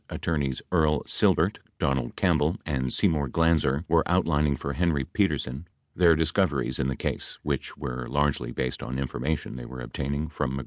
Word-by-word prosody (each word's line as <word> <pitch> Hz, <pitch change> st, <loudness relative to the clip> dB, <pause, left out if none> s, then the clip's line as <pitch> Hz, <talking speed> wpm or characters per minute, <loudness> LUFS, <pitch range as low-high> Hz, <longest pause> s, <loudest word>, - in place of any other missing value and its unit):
Attorneys 70 Hz, -5 st, -2 dB
Earl 80 Hz, -4 st, +3 dB
Silbert, -, -, +2 dB, 0.2 s
Donald 65 Hz, -3 st, 0 dB
Campbell 80 Hz, 0 st, +2 dB
and 65 Hz, -4 st, -1 dB
Seymour 75 Hz, -2 st, +2 dB
Glanzer, 80 Hz, -1 st, +2 dB
were 80 Hz, 0 st, +4 dB
outlining 75 Hz, -1 st, +2 dB
for 70 Hz, -, -4 dB
Henry 80 Hz, -4 st, +1 dB
Petersen 65 Hz, +5 st, -1 dB, 0.3 s
their 85 Hz, -2 st, +6 dB
discoveries 75 Hz, -6 st, +1 dB
in 65 Hz, -, +1 dB
the 65 Hz, -, -1 dB
case, -, -, -3 dB
which 70 Hz, -2 st, -3 dB
were 60 Hz, 0 st, -4 dB
largely 70 Hz, -3 st, 0 dB
based 65 Hz, 0 st, -2 dB
on 65 Hz, -, -4 dB
information 70 Hz, +2 st, -2 dB
they -, -, -7 dB
were 65 Hz, +1 st, -8 dB
obtaining 70 Hz, +5 st, -3 dB
from -, -, -10 dB
Magruder 75 Hz, -, -2 dB
and -, -, -2 dB
Dean. -, -, -2 dB
70 Hz, 175 wpm, -27 LUFS, 65-80 Hz, 0.3 s, their